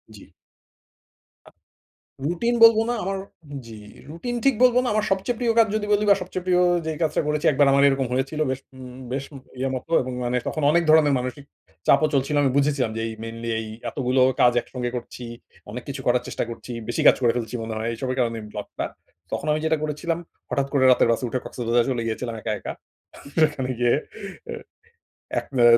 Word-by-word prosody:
জি। 100 Hz, -, -15 dB, 1.2 s
আ -, -, -13 dB, 0.8 s
routine 205 Hz, +9 st, 0 dB
বলবো 225 Hz, -1 st, +8 dB
না। 240 Hz, -, +1 dB
আমার 195 Hz, +1 st, -2 dB, 0.5 s
জি, 115 Hz, -1 st, -10 dB, 0.3 s
রুটিন 240 Hz, +10 st, -4 dB
ঠিক 275 Hz, -3 st, +5 dB
বলবো 250 Hz, -1 st, +6 dB
না। -, -, -1 dB
আমার 215 Hz, 0 st, +1 dB
সবচেয়ে 195 Hz, +5 st, 0 dB
প্রিয় 235 Hz, -2 st, +2 dB
কাজ 225 Hz, -, +6 dB
যদি 215 Hz, -, -1 dB
বলি 205 Hz, -, +2 dB
বা 200 Hz, -, +7 dB
সবচেয়ে 180 Hz, 0 st, -5 dB
প্রিয় 180 Hz, -1 st, +3 dB, 0.3 s
যেই 160 Hz, -1 st, -3 dB
কাজটা 155 Hz, -, +1 dB
করেছি 150 Hz, 0 st, -1 dB
একবার 140 Hz, +1 st, +4 dB
আমার 140 Hz, +1 st, +4 dB
এরকম 135 Hz, -2 st, +1 dB
হয়েছিল 135 Hz, +4 st, -1 dB
বেশ, 130 Hz, -, -3 dB, 0.2 s
উম 125 Hz, -1 st, -10 dB
বেশ, 135 Hz, +1 st, -2 dB, 0.3 s
ইয়ের 135 Hz, 0 st, -1 dB
মতো 130 Hz, +6 st, -7 dB
এবং 130 Hz, 0 st, -4 dB
মানে 125 Hz, +1 st, 0 dB
তখন 155 Hz, -, -2 dB
অনেক 170 Hz, +2 st, +3 dB
ধরনের 155 Hz, -2 st, +6 dB
মানসিক 125 Hz, +3 st, -5 dB, 0.4 s
চাপও 155 Hz, -, +5 dB
চলছিল। 140 Hz, +2 st, +1 dB
আমি 135 Hz, -, +3 dB
বুঝেছিলাম 140 Hz, -5 st, +1 dB
যে -, -, -2 dB
এই 110 Hz, -, -5 dB
মেইনলি 115 Hz, +1 st, -6 dB
এই 110 Hz, -, -5 dB, 0.2 s
এতগুলো 130 Hz, -1 st, +1 dB, 0.2 s
কাজ 120 Hz, -, +6 dB
একসঙ্গে 125 Hz, -1 st, -4 dB
করছি, 125 Hz, 0 st, -7 dB, 0.5 s
অনেক 120 Hz, +3 st, -6 dB
কিছু 140 Hz, -1 st, -5 dB
করার 125 Hz, 0 st, +3 dB
চেষ্টা -, -, -2 dB
করছি, 115 Hz, +2 st, -8 dB, 0.2 s
বেশি 120 Hz, -, -1 dB
কাজ -, -, +8 dB
করে 120 Hz, -2 st, +4 dB
ফেলছি 120 Hz, 0 st, -3 dB
মনে 110 Hz, 0 st, -4 dB
হয়। 110 Hz, +1 st, -2 dB
এইসবের 130 Hz, +2 st, -3 dB
কারণে 115 Hz, -2 st, 0 dB
ব্লকটা। 105 Hz, -1 st, -5 dB, 0.5 s
তখন -, -, -3 dB
আমি 150 Hz, -, +1 dB
যেটা 160 Hz, 0 st, +2 dB
করেছিলাম 160 Hz, +2 st, -2 dB, 0.3 s
হঠাৎ 140 Hz, -1 st, 0 dB
করে 140 Hz, -2 st, +3 dB
রাতের 125 Hz, -, +4 dB
বাসে 115 Hz, -, -1 dB
উঠে 130 Hz, +2 st, -2 dB
কক্সবাজার 120 Hz, 0 st, 0 dB
চলে 125 Hz, -3 st, -1 dB
গিয়েছিলাম 115 Hz, +1 st, -3 dB
একা, -, -, -2 dB
একা। -, -, -5 dB, 0.7 s
সেখানে 150 Hz, -4 st, +1 dB
গিয়ে 120 Hz, -1 st, +3 dB, 0.6 s
আ -, -, -3 dB, 0.9 s
১ -, -, -15 dB, 0.2 s
অ -, -, +6 dB
135 Hz, 195 wpm, -24 LUFS, 120-160 Hz, 1.2 s, বলবো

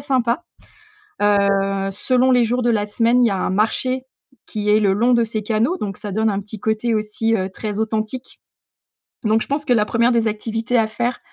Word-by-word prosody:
sympa. 255 Hz, +1 st, 0 dB, 0.8 s
Heu, 195 Hz, -1 st, +2 dB
selon 255 Hz, +5 st, +2 dB
les 245 Hz, -2 st, +4 dB
jours 245 Hz, +2 st, 0 dB
de 240 Hz, -, +2 dB
la 210 Hz, -2 st, +1 dB
semaine, 235 Hz, +4 st, +2 dB
il -, -, +4 dB
y -, -, -1 dB
a 195 Hz, -, -1 dB
un 185 Hz, -, -1 dB
marché 240 Hz, +6 st, 0 dB, 0.4 s
qui 210 Hz, -1 st, -4 dB
est 210 Hz, +1 st, +4 dB
le 200 Hz, -2 st, +3 dB
long 235 Hz, +5 st, +2 dB
de 235 Hz, -1 st, +4 dB
ces 215 Hz, -1 st, -4 dB
canaux 225 Hz, -, 0 dB
donc 195 Hz, -2 st, -4 dB
ça 210 Hz, -, -6 dB
donne 220 Hz, +3 st, +1 dB
un 200 Hz, 0 st, -1 dB
petit 210 Hz, +2 st, -9 dB
côté 220 Hz, +3 st, 0 dB
aussi, 215 Hz, +1 st, -1 dB
heu, 190 Hz, -2 st, -2 dB
très 210 Hz, +2 st, -5 dB
authentique, 220 Hz, +3 st, -3 dB, 0.8 s
donc 220 Hz, 0 st, +2 dB
je -, -, -5 dB
pense 290 Hz, +2 st, -2 dB
que 250 Hz, -, +3 dB
la 215 Hz, -3 st, +3 dB
1re 235 Hz, +2 st, +2 dB
des 230 Hz, -2 st, +2 dB
activités 225 Hz, +3 st, -2 dB
à 220 Hz, -1 st, +3 dB
faire 240 Hz, +3 st, -2 dB
220 Hz, 210 wpm, -20 LUFS, 210-240 Hz, 0.8 s, les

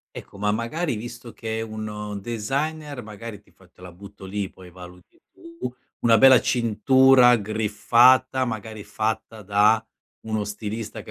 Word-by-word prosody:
Ecco, -, -, -10 dB
ma 105 Hz, +1 st, 0 dB
magari 120 Hz, +5 st, -2 dB
visto 120 Hz, +1 st, -9 dB
che 110 Hz, 0 st, -5 dB
è -, -, -3 dB
un 105 Hz, -2 st, -6 dB
designer 140 Hz, +6 st, -4 dB
magari 105 Hz, 0 st, -9 dB
ti 105 Hz, -, -28 dB
f 90 Hz, -2 st, -24 dB
te -, -, -24 dB
la 90 Hz, -, -10 dB
butto 95 Hz, +1 st, -13 dB
lì, 100 Hz, 0 st, -4 dB
poi 95 Hz, -1 st, -15 dB
valuti 90 Hz, 0 st, -15 dB
tu, 165 Hz, -7 st, -8 dB, 0.3 s
una 115 Hz, -1 st, +4 dB
bella 130 Hz, +1 st, +8 dB
cintura 125 Hz, +1 st, +4 dB
griffata, 115 Hz, +5 st, +3 dB
magari 110 Hz, -2 st, -6 dB
fatta 110 Hz, 0 st, -3 dB
da 105 Hz, +2 st, +3 dB, 0.4 s
uno 110 Hz, -1 st, -2 dB
stilista 105 Hz, +1 st, -6 dB
che -, -, -14 dB
110 Hz, 150 wpm, -23 LUFS, 105-125 Hz, 0.4 s, bella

